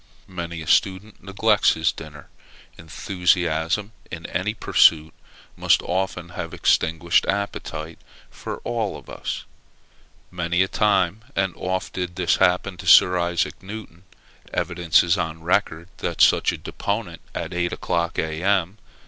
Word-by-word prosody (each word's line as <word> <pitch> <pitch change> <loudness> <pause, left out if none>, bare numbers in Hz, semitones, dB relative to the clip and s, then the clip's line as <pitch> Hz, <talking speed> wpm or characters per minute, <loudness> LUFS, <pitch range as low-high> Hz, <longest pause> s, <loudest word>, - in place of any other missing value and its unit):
Many 85 -2 -6
a - - -12
student 95 +3 +1
neglects 100 0 +2
his 80 -1 +1
dinner; 75 -2 -11 0.5
enthusiasm 85 +3 -1 0.2
in 85 -1 -8
any 105 +4 -2
pursuit 80 -7 +4 0.4
must - - +2
often 90 -1 -2
have 85 - -6
extinguished 85 +1 +2
appetite 100 -5 -4 0.3
for - - -6
all 115 -4 -2
of - - -13
us. - - -5 0.9
Many 85 +1 +1
a - - -2
time 100 0 +1
and 95 -2 0
oft 95 0 -3
did 90 -1 -4
this 90 -2 +1
happen 90 +1 +1
to - - -9
Sir 90 0 +7
Isaac 85 0 -1
Newton. 95 -3 -10 0.5
Evidence 85 -1 +2
is 85 +1 +1
on 80 -1 -4
record, 85 -2 0
that - - -4
such - - +5
a - - -5
deponent 100 -5 -4
at 85 +2 -4
eight 85 0 -1
o'clock, 85 0 -2
A.M. 90 +5 0
90 Hz, 135 wpm, -23 LUFS, 85-95 Hz, 0.9 s, Sir